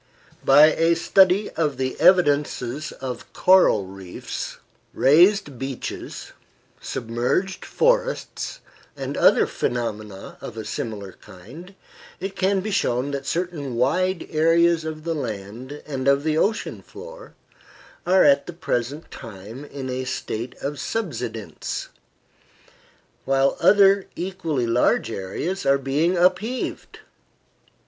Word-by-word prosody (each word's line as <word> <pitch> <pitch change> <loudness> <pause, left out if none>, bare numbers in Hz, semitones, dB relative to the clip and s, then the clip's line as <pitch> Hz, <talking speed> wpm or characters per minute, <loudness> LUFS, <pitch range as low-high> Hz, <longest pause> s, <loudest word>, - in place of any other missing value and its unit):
By 150 +3 +7
a 165 +1 +3
study 190 +3 +3
of 150 -5 -1
the 130 0 -2
evidences 145 -5 +3
presented 130 -2 -6
by - - -15 0.2
coral 180 - +5
reefs, 95 -1 -7 0.4
raised 165 - +4
beaches, 135 -1 -6 0.5
submerged 120 - -2
forests, - - 0 0.4
and - - -4
other - - +5
phenomena 110 -5 -4
of 115 - -8
a 110 - -5
similar 105 -8 -5
kind, 125 - -13 0.4
it 190 +1 -5
can 190 0 +1
be 215 +3 -4
shown 130 -6 0
that 140 -1 -4
certain 165 -7 -3
wide 175 +9 +1
areas 165 +1 +3
of 155 -1 -6
the 165 0 -1
land 120 +1 -6
and 135 -3 -4
of 140 +1 +4
the 155 -1 0
ocean 205 +7 0
floor - - -12 0.7
are 185 +1 +4
at 140 -1 +4
the 175 - -6
present 140 -1 -3
time 110 +3 -9
in 140 -2 -7
a 130 0 -3
state 120 -1 -4
of 140 0 -3
subsidence, 125 - -4 1.4
while 135 0 +2
other 200 -1 +5
equally 170 -8 -2
large 115 0 +2
areas 115 - -4
are 140 0 +4
being 145 +7 0
upheaved. 190 +8 -1
145 Hz, 120 wpm, -23 LUFS, 125-180 Hz, 1.4 s, By